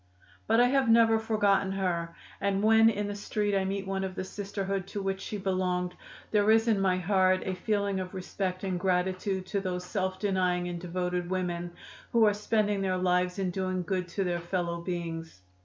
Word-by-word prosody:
"But 225 - +4
I 245 - +7
have 260 -1 +2
never 225 -1 +5
forgotten 205 -3 +2
her, 170 -3 -2 0.2
and 200 0 0
when 225 +1 +6
in 210 -2 -1
the 205 - -3
street 205 0 -1
I 190 -1 +1
meet 195 0 -2
one 195 0 -2
of 190 -1 -4
the 185 - -3
Sisterhood 195 -1 -4
to 200 - -4
which 195 0 -2
she 210 - -4
belonged 185 -2 -1 0.4
there 210 0 +3
is 225 +1 +5
in 215 -4 +3
my 185 -1 +2
heart 185 0 +2
a 190 - -1
feeling 200 +1 -1
of 185 +1 -6
respect 185 0 -3
and 185 -2 -1
gratitude 185 +1 0
to 200 +2 -1
those 180 -1 -3
self 190 -1 -2
denying 180 -3 0
and 175 -1 -5
devoted 180 0 -2
women 175 -2 -2 0.4
who 230 -2 +6
are 210 - +4
spending 210 -1 0
their 185 -1 0
lives 180 0 +1
in 190 -2 -1
doing 185 0 -2
good 180 0 -2
to 195 +3 -2
their 175 -2 -1
fellow 170 -1 -2
beings. 165 - -5
190 Hz, 195 wpm, -29 LUFS, 180-205 Hz, 0.4 s, I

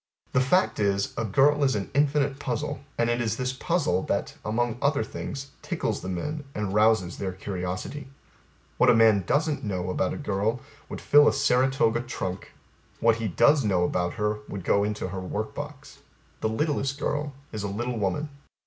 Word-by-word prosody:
The 130 - +3
fact 180 +9 +2
is 100 -1 +1
A 115 - -1
girl 140 +7 +3
is 130 -4 +3
an 100 -2 -3
infinite 145 -1 +2
puzzle, 125 -5 -3 0.2
and 115 - +2
it 120 0 +1
is 115 -1 -1
this 130 0 -1
puzzle, 140 - 0
that, - - -1
among 120 +2 -1
other 140 0 +2
things, 135 0 -6
tickles - - -2
the 90 - -5
men, 150 - -3
and 105 -2 -2
rouses 105 -4 +3
their 95 -2 -2
curiosity. 95 +8 -5 0.7
What - - +6
a - - +6
man 110 -3 +5
doesn't 150 0 +1
know 95 -4 -2
about 90 - 0
a - - -6
girl 110 -2 -1 0.3
would - - -6
fill 145 0 +6
a - - +4
Saratoga 130 -3 +2
trunk; 100 -6 -5 0.5
what 115 -1 +4
her 115 -1 -2
does 145 - +4
know 95 -4 +2
about 90 0 0
her 105 -1 -1
would 100 -3 -5
go 100 +3 +3
into 105 -2 -2
her 95 0 -5
work 105 +4 -4
box. 145 -1 -8 0.4
The 110 - 0
littlest 135 +2 -1
girl 145 0 -2 0.2
is 110 - -4
a 100 - -2
little 120 +4 -3
women. 105 +10 -1
115 Hz, 185 wpm, -26 LUFS, 100-140 Hz, 0.7 s, What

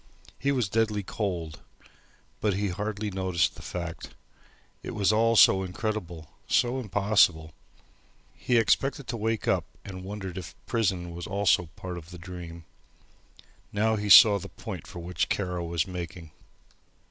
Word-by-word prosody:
He 140 - +1
was 125 -6 +1
deadly 105 0 0
cold, 90 -6 -4 0.8
but 105 -3 +1
had 100 -1 -1
hardly 105 +2 -3
noticed 95 -4 0
the - - -12
fact. 85 -2 -6 0.7
It - - -6
was 105 0 +2
all 115 +1 +3
so 95 -3 +7
incredible, 90 -4 -4 0.2
so 125 +2 +2
impossible. 100 -7 +2 0.8
He 120 - 0
expected 135 +5 +1
to 120 - -2
wake 110 -1 -2
up - - +2 0.2
and 95 -2 -8
wondered 95 -2 -6
if - - -9
the - - -34
prison 95 -7 -1
was 85 +1 -6
also 100 -3 +2
part 90 -1 -6
of 80 0 -15
the 90 - -10
dream. 85 -1 -9 1.1
Now 110 +2 +1
he 105 -1 -3
saw 105 -1 +9
the - - -9
point - - -8
for - - -10
which 85 +1 -2
Kara 90 -3 -2
was 85 -2 -1
making. 85 -3 -7
95 Hz, 150 wpm, -27 LUFS, 85-110 Hz, 1.1 s, saw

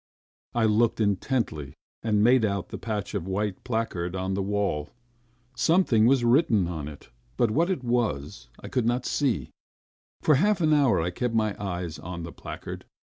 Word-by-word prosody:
I 115 -1 +3
looked 110 +2 +2
intently 100 - -1 0.3
and 105 -2 +2
made 125 +1 +5
out 100 -3 0
of - - -29
the - - -5
patch 105 -3 -4
a 100 - 0
white 95 +2 -3
placard 110 -7 -2
on 95 +1 -2
the 100 - -1
wall. 100 -7 -1 0.7
Something 160 - +4
was 130 -1 +4
written 120 - +3
on 80 -4 -4
it, 75 -2 -11 0.3
but 115 - +2
what 165 - +2
it 180 -9 -1
was, 110 - -1
I - - -9
could 125 -4 0
not 120 +1 0
see... 120 - 0 0.7
For 155 - +5
half 210 -1 +3
an 155 -2 +3
hour 140 -4 +4
I 85 +2 -1
kept 115 +5 -2
my 110 -2 +1
eyes 90 -4 -4
on 85 -1 -6
the 85 - -6
placard. - - -8
110 Hz, 175 wpm, -26 LUFS, 90-125 Hz, 0.7 s, made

